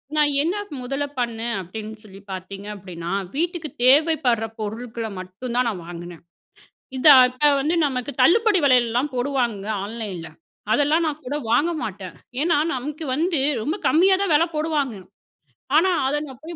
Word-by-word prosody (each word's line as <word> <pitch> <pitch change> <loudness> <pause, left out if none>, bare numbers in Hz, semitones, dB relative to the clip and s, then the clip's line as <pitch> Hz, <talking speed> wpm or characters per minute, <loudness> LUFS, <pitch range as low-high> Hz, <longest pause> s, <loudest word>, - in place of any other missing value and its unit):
நான் 300 -1 +3
என்ன 340 +6 0 0.3
முதல 275 +3 -2 0.2
பண்ணேன் 235 -1 -2
அப்படின்னு 215 +4 -7
சொல்லி 195 -2 -13
பார்த்தீங்க 195 +2 -7
அப்படின்னா, 175 -3 -7 0.2
வீட்டுக்கு 335 0 -2 0.2
தேவைப்படுற 270 -5 +4
பொருட்கள 225 +2 -5
மட்டும் 190 +7 -7
தான் 250 0 +2
நான் 190 -6 -5
வாங்கினேன். 175 -1 -9 0.8
இத 255 - -5 0.2
அத 255 +4 +3
வந்து 310 +5 0
நமக்கு 260 -1 -2
தள்ளுபடி 415 - +4
வெலையெல்லாம் 250 +1 +3
போடுவாங்கங்க 245 -6 -1
ஆன்லைன்ல. 205 -6 -5 0.5
அதெல்லாம் 300 +3 +3
நான் 310 -1 -3
கூட 280 - -3 0.2
வாங்க 330 +8 +3
மாட்டேன். 190 -3 -6 0.3
ஏன்னா, 330 -2 +2 0.2
நமக்கு 295 +5 -5
வந்து 330 +1 +1 0.2
ரொம்ப 305 - -1
கம்மியா 375 +4 +5
தான் 395 -4 0
வெல 310 +3 +5
போடுவாங்க. 300 -6 -1 0.8
ஆனா, 370 +3 +4 0.2
அத 275 - 0
நான் 265 +1 -12
போய் 340 +2 -7
255 Hz, 145 wpm, -22 LUFS, 220-305 Hz, 0.8 s, கம்மியா